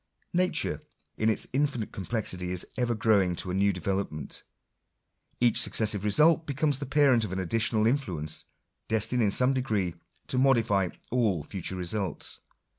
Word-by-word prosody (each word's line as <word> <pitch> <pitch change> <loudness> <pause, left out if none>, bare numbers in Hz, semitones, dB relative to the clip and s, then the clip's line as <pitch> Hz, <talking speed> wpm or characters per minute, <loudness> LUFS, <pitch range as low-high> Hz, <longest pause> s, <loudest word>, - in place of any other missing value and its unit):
/Nature 180 +1 +1 0.3
in; 110 - +1
its 110 - +1
infinite 135 -5 0
complexity 95 -3 -3
is 90 -1 0
ever 120 -2 0
growing 100 -5 +3
to 90 - -3
a - - -3
new 100 +2 +3
development.!. 90 -5 -3 1.0
Each 120 -2 +4
successive 105 -3 +1
result 155 +10 +4
becomes 145 0 0
the 140 - -5
parent 135 -4 +4
of 105 - -4
an 95 - -3
additional 110 +3 +1
in 130 +6 +3
fluence, 80 - -5 0.4
destined 110 +3 +1
in 105 - +3
some 125 +6 +2
degree 105 -9 -1 0.3
to 125 - -1
modify 115 -8 +3 0.2
all 110 -10 +1
future 95 +3 -5
results. 90 -1 -3
110 Hz, 150 wpm, -28 LUFS, 95-125 Hz, 1.0 s, Each